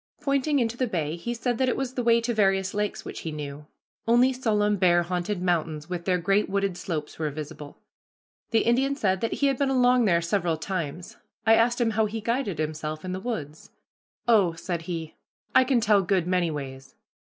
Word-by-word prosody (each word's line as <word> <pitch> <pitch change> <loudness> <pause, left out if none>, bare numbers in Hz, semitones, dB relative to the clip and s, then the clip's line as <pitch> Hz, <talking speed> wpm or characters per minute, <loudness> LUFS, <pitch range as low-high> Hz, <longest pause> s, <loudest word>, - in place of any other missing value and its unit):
Pointing 285 0 +1
into 235 -2 0
the 255 - 0
bay 160 -7 -2
he 235 +8 -4
said 235 0 -2
that 260 -1 +2
it - - -1
was 265 -2 -3
the 250 - -2
way 235 -1 +4
to 240 +1 -1
various 195 -2 +2
lakes 210 0 -2
which - - -6
he 160 - -5
knew. 150 -1 -7 0.4
Only 245 +3 +4
solemn 210 -5 +1
bear 175 -2 +4
haunted 180 +2 -2
mountains 165 -2 -1
with 175 -1 -4
their 185 -1 +2
great 195 +4 +1
wooded 200 -1 0
slopes 160 -5 -5
were 155 -1 0
visible. 150 0 -8 0.7
The 225 -1 +3
Indian 265 +4 +2
said 190 -8 0
that 230 - -1
he 285 - 0
had 275 -2 +1
been 280 -1 +2
along 250 -2 +4
there 170 -4 +3
several 170 -2 0
times. 170 0 -5 0.3
I 225 - +6
asked 235 +2 +3
him 235 -2 +2
how 220 0 +1
he 225 +2 -4
guided 230 - -1
himself 155 +1 -4
in 185 - -4
the 185 - -3
woods. 160 -9 -5 0.6
"Oh," 205 -8 +4
said 170 0 -4
he, 165 -3 -4 0.4
"I 260 - +6
can 255 -1 +2
tell 210 -3 +4
good 185 -2 +1
many 180 -1 +1
ways." 135 -3 -7
195 Hz, 205 wpm, -26 LUFS, 165-235 Hz, 0.7 s, I